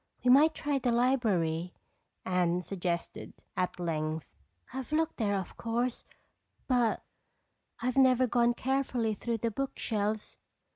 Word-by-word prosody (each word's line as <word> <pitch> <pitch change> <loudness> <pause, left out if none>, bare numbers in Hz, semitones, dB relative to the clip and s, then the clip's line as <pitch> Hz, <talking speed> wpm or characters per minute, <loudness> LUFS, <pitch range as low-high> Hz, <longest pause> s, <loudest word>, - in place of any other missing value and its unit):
"We 250 - +5
might 305 +5 +6
try 290 -2 -1
the 245 -1 +1
library," 200 -10 +1 0.5
Anne 180 -1 +1
suggested 175 -3 -4
at 180 0 -1
length. 155 -2 -2 0.5
"I've 265 +2 -5
looked 320 +1 0
there 205 -4 +1
of 190 - -5
course, 235 +2 -2 0.6
but 245 -4 +2 0.8
I've 255 +1 0
never 255 -1 +5
gone 240 0 +2
carefully 255 -4 0
through 230 +2 -2
the 230 +1 -1
book 275 +5 -3
shelves." 215 -1 -2
230 Hz, 130 wpm, -30 LUFS, 180-255 Hz, 0.8 s, might